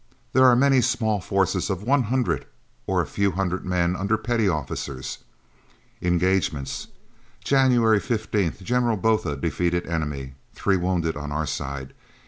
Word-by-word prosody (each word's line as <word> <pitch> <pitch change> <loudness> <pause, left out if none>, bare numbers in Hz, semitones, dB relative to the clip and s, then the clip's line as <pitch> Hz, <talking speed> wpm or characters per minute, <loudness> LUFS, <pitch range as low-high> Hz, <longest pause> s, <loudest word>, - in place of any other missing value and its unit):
There 130 +1 +6
are 125 - +6
many 135 0 +4
small 110 -3 +1
forces 95 0 0
of 95 0 -2
100 125 -1 +1 0.4
or - - +2
a - - -5
few 100 -2 0
hundred 90 0 -1
men 90 -1 +1
under 100 +4 0
petty 115 -4 +1
officers. 70 -4 -4 0.8
Engagements: 90 -4 0 0.6
January 125 -5 +4
15th 105 -6 -1
General 120 +1 +1
Botha 110 -8 +1
defeated 85 +5 -1
enemy. 75 -5 -3 0.2
Three 100 - +1
wounded 90 -2 0
on 75 0 -5
our 75 +1 -1
side. 65 -2 -5
95 Hz, 130 wpm, -24 LUFS, 85-115 Hz, 0.8 s, There